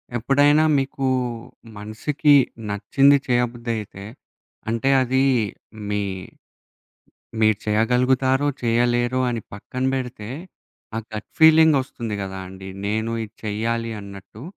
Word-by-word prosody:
ఎప్పుడైనా 145 +5 +3 0.2
మీకు 135 0 -3 0.7
మనసికి 135 +8 +1 0.4
నచ్చింది 135 +8 +3
చేయబుద్దయితే, 120 -5 -2 0.7
అంటే 115 +4 0
అదీ 130 +1 +1 0.7
మీ 105 0 0 1.4
మీరు 110 -1 +4
చేయగలుగుతారో 125 +5 +2 0.2
చేయలేరో 120 +1 +1
అని 115 -2 -3
పక్కన 130 +5 -5
బెడితే, 125 -4 -5 0.7
ఆ - - 0 0.2
గట్ 105 - -6
ఫీలింగొస్తుంది 150 -8 +4
గదా 95 0 -6
అండీ! 95 0 -10 0.2
నేను 110 +2 -1
ఇది 110 +1 -14
చెయ్యాలి 115 +2 -2
అన్నట్టు. 100 +2 -12
120 Hz, 95 wpm, -22 LUFS, 105-130 Hz, 1.4 s, మీరు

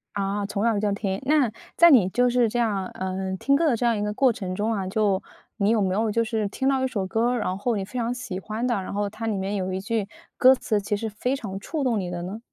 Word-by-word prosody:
啊， 200 0 -1
从 205 +1 -2
小 225 -3 +2
就 205 -1 0
听。 195 -1 -2
那， 285 -5 +3 0.2
在 340 - +7
你 225 -10 +6
就 245 +5 +2
是 240 -2 +3
这 240 - -3
样， 205 -5 0
呃， 190 0 -4
听 275 +8 +2
歌 330 +3 +2
的 265 - +3
这 240 - -1
样 235 -1 +3
一 - - -2
个 210 0 -2
过 260 +3 +4
程 190 -5 -5
中 215 +3 0
啊， 195 -3 -2
就 200 -1 +1 0.4
你 200 -1 +2
有 225 -1 +3
没 185 -1 +1
有 220 +2 +1
就 230 +2 +2
是 220 -2 -1
听 265 +7 -2
到 270 -1 +2
一 - - +2
首 205 -7 -2
歌 225 +5 +1
儿， 250 - 0
然 185 -3 -2
后 225 +3 0
你 200 - -2
非 245 +6 -5
常 235 +1 -1
喜 220 -6 -5
欢 215 +4 -4
的， 245 -1 +1
然 185 - -6
后 205 0 -1
它 220 +2 -6
里 215 -3 0
面 195 +2 -2
有 190 -1 -2
一 185 - -2
句 210 0 -1 0.3
歌 260 -1 +7
词 215 -4 -1
其 205 +1 -1
实 220 +2 -3
非 250 +6 -2
常 195 -7 -6
触 300 +7 -3
动 240 -5 +1
你 180 -2 -3
的 175 -1 -4
呢？ 195 +5 -6
215 Hz, 305 characters per minute, -25 LUFS, 195-240 Hz, 0.4 s, 在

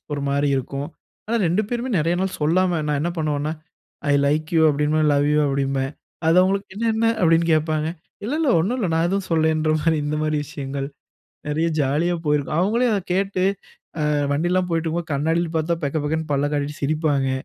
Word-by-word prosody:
ஒரு 145 - -2
மாரி 140 +1 +1
இருக்கும். 140 +2 -4 0.4
ஆனா 235 - 0
2 180 +6 +2
பேருமே 245 +2 -2
நிறைய 165 +3 +1
நாள் 190 0 -2
சொல்லாம 175 +3 +2
நான் 150 -1 0
என்ன 170 +3 -1
பண்ணுவேன்னா, 150 -1 -1 0.6
"I - - +4
like 155 +2 0
you" 160 - +5
அப்படிம்பேன் 150 +2 +1
"I - - +3
love 145 0 +2
you" - - +3
அப்படிம்பேன். 135 -1 -1 0.4
அது 165 - +4
அவங்களுக்கு 195 +1 0
"என்ன 230 +3 -2
என்ன?" 225 +1 +1 0.2
அப்படின்னு 165 0 +4
கேப்பாங்க. 155 0 0 0.3
இல்ல 240 +8 -2
இல்ல 310 -5 +2
ஒண்ணும் 205 +10 0
இல்ல 205 - 0
நான் 165 +1 +2
எதுவும் 195 +1 -1
சொல்லலங்கற 160 -1 +2
மாரி, 165 -1 +2
இந்த 150 +1 -1
மாரி 155 0 0
விஷயங்கள் 140 -1 -5 0.6
நிறைய 155 +3 0
ஜாலியா 150 +6 +1
போயிருக்கும். 150 0 0
அவங்களே 230 +6 +2
அத 200 - 0
கேட்டு 190 0 0 0.9
வண்டிலலாம் 180 +4 +1
போய்ட்டு 165 0 0
இருக்கும்போது, 165 0 -3
கண்ணாடியில 160 +4 0
பார்த்தா 165 +1 -1
பெக்க 145 +2 -1
பெக்கன்னு 160 0 -2
பல்ல 140 +1 +1
காட்டிட்டு 145 0 -2
சிரிப்பாங்க. 145 -2 +1
160 Hz, 180 wpm, -22 LUFS, 145-175 Hz, 0.9 s, you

